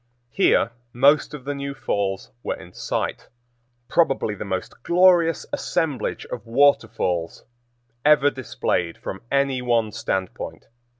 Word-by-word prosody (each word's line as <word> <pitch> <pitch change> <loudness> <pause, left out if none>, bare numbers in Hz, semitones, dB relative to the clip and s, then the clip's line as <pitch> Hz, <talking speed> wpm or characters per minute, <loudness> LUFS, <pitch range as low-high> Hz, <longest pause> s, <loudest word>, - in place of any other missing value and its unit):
Here 115 - +3 0.2
most 140 +4 +4
of 135 -3 -11
the 145 - -2
new 140 0 -5
falls 95 -5 -2
were - - -3
in 90 +2 -13
sight, - - -3 0.6
probably 135 -10 +2
the 105 - -6
most 95 +2 -5
glorious 175 0 +4
assemblage 145 -8 -1
of - - -5
waterfalls 115 -9 +1 0.6
ever 150 -1 +5
displayed 120 -10 -2
from 95 - -7
any 140 -2 +1
one 115 -3 +1
standpoint. 95 -2 -4
130 Hz, 120 wpm, -23 LUFS, 105-145 Hz, 0.6 s, ever